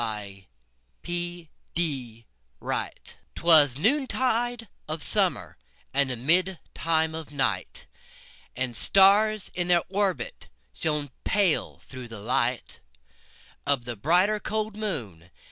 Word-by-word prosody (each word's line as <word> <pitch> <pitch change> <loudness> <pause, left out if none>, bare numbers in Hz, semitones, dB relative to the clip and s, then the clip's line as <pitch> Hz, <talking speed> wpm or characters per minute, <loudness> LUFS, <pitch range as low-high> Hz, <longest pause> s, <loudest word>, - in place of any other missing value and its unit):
1827 100 - -6 0.3
Evening 130 -9 -3 0.3
Star - - -2 0.5
'Twas 150 -6 +5
noontide 245 - 0 0.2
of 155 0 -4
summer, - - +1 0.4
And 140 0 +2 0.2
midtime 165 -2 +1
of 160 -1 -7
night, 135 -2 -1 0.7
And 130 -1 -2
stars, 200 - +4
in 175 -1 -1
their 175 -1 +4
orbits, 190 - -2 0.3
Shone 150 -3 -1
pale, 195 -5 +1
through 130 -2 -9
the 115 -2 -9
light 120 +3 -1 0.9
Of 140 -4 +1
the 120 -1 -5
brighter, 180 - +2
cold 215 0 -2
moon. 115 - -5
160 Hz, 100 wpm, -26 LUFS, 120-195 Hz, 0.9 s, Twas